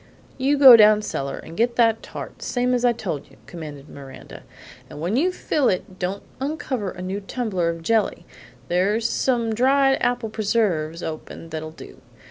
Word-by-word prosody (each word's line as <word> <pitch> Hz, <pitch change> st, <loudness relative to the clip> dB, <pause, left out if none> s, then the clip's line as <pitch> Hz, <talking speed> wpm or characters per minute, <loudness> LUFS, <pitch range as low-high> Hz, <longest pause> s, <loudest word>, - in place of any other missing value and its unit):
"You 280 Hz, +3 st, +2 dB
go 265 Hz, -4 st, +10 dB
down 210 Hz, -1 st, +6 dB
cellar 140 Hz, -8 st, -4 dB
and 165 Hz, -, -10 dB
get 235 Hz, +4 st, +1 dB
that 225 Hz, -2 st, +3 dB
tart, -, -, -9 dB
same 250 Hz, 0 st, 0 dB
as 245 Hz, 0 st, 0 dB
I 245 Hz, -, +5 dB
told 185 Hz, -11 st, -5 dB
you," -, -, -20 dB
commanded 150 Hz, -4 st, -9 dB
Miranda, 135 Hz, -2 st, -11 dB, 0.5 s
"and 145 Hz, -, -10 dB
when 175 Hz, +7 st, -1 dB
you 340 Hz, +8 st, +2 dB
fill 295 Hz, -7 st, 0 dB
it 185 Hz, 0 st, -3 dB
don't 190 Hz, +2 st, -3 dB, 0.2 s
uncover 265 Hz, -7 st, -3 dB
a 180 Hz, 0 st, -8 dB
new 190 Hz, +2 st, -3 dB
tumbler 195 Hz, -5 st, -2 dB
of 165 Hz, 0 st, -5 dB
jelly; 210 Hz, -4 st, 0 dB, 0.4 s
there's 200 Hz, -, +1 dB
some 235 Hz, -4 st, 0 dB
dried 270 Hz, +3 st, +3 dB
apple 245 Hz, -3 st, -1 dB
preserves 190 Hz, -7 st, -1 dB
open 160 Hz, +1 st, -7 dB
that'll 155 Hz, 0 st, -5 dB
do. 155 Hz, -, -13 dB
210 Hz, 170 wpm, -22 LUFS, 170-245 Hz, 0.5 s, go